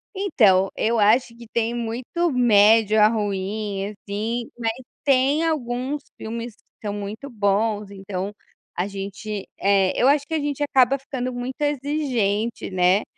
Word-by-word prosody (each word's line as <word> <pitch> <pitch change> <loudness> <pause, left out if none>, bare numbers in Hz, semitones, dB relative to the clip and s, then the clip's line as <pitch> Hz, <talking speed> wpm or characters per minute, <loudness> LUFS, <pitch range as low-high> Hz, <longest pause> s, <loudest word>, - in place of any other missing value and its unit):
Então, 210 - +3
eu 230 0 +1
acho 230 +3 +3
que 235 -1 -12
tem 235 0 0
muito 245 +9 -2
médio 220 -3 +5
a 210 - +8
ruim 205 -1 -2
assim, 215 +3 -4
mas 225 -1 0 0.3
tem 275 +3 +3
alguns 265 -1 -2 0.2
filmes 230 0 -6
que 210 - -12
são 205 - -2
muito 205 +6 -6
bons. 205 -1 0
Então, 195 0 -5 0.5
a 180 +3 0
gente 200 +1 -6
eh, 195 -1 +3
eu 255 - +5
acho 285 0 +3
que 325 - -6
a 315 - +1
gente 290 0 -2
acaba 270 -1 +3
ficando 255 -2 -4
muito 250 +3 -5
exigente, 260 -7 -1
né 185 +2 +3
225 Hz, 145 wpm, -23 LUFS, 205-260 Hz, 0.5 s, a